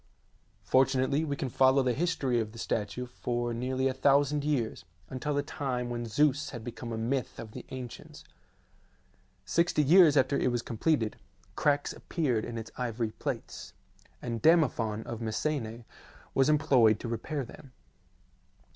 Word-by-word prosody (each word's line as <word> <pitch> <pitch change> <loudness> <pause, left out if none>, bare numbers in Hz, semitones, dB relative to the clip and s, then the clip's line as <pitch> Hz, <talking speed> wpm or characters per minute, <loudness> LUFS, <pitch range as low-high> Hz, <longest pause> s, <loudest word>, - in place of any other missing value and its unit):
Fortunately 130 +2 +2
we 145 -3 -2
can 135 - -3
follow 130 +2 +4
the 125 -1 +1
history 140 -5 0
of 110 -1 -3
the - - -11
statue 115 +2 -2
for 120 -1 -3
nearly 130 +2 -1
a 130 - 0
thousand 140 +2 +3
years, 135 -11 -1 0.3
until 140 +3 -2
the 145 - +1
time 125 -5 -3
when 120 -1 -3
Zeus 145 +4 +2
had 120 -4 -7
become 120 +1 -7
a 115 - -3
myth 125 +4 -2
of 110 -2 -8
the - - -9
ancients. 125 -2 -8 1.2
Sixty 170 -3 +2
years 160 0 +6
after 135 +1 +3
it 130 - +1
was 120 -1 -1
completed, 115 -2 0 0.4
cracks 145 -1 +1
appeared 125 -10 -1
in 115 - -6
its 110 -1 -7
ivory 115 -2 -2
plates, - - -6 0.5
and 115 -2 -3
Damophon 125 -10 +3
of 115 -1 -6
Messene 115 0 -2 0.5
was 135 +2 +3
employed 130 -8 +4
to - - -4
repair 130 +5 -3
them. 135 +3 -13
130 Hz, 150 wpm, -29 LUFS, 115-145 Hz, 1.2 s, years